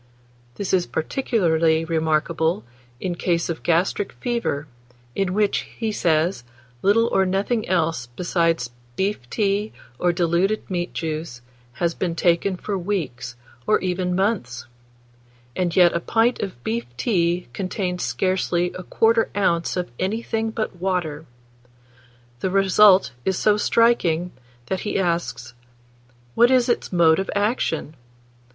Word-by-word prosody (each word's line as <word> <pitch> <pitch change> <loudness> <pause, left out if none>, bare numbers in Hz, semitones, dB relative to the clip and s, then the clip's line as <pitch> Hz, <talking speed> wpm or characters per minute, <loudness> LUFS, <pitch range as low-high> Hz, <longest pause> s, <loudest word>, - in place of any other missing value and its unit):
This 200 -2 -3
is 180 -2 +2
particularly 165 -6 +1
remarkable 160 -1 0 0.4
in 180 +3 -2
case 170 -1 -1
of 165 - -3
gastric 175 +4 0
fever, 235 - -2 0.5
in 195 +3 -1
which, 210 -1 +2 0.2
he 225 -2 -1
says, 165 - +1 0.4
little 220 +4 +4
or 190 - +3
nothing 195 +4 -1
else 165 -8 0
besides 165 +1 0 0.2
beef 190 -10 -2
tea, 205 0 0 0.3
or 175 - +3
diluted 175 +4 0
meat 175 -1 -3
juice, 155 -6 -4 0.3
has 170 +7 -1
been 170 -1 -2
taken 175 +3 +1
for 205 +2 -4
weeks, 155 - -3 0.3
or 215 - +4
even 180 -1 -1
months; 185 - -1 0.9
and 175 -2 -1
yet 175 -2 +6
a 170 - +1
pint 225 +7 +1
of 180 -12 -5
beef 115 +1 -2
tea 175 - 0
contains 185 - -3
scarcely 180 -2 0
1/4 225 +5 +1
oz. 170 -4 +1
of 180 -9 -3
anything 225 +3 -1
but 220 -4 -4
water. 170 -4 -2 1.1
The 190 - -1
result 195 +1 +5
is 190 -2 0
so 210 -1 +3
striking, 195 -7 +2 0.3
that 190 +8 -2
he 210 - -2
asks, 130 -10 -2 0.8
"What 240 - +5
is 255 -1 +3
its 240 - 0
mode 165 -2 +4
of 195 - -3
action? 200 - -1
180 Hz, 130 wpm, -22 LUFS, 165-200 Hz, 1.1 s, yet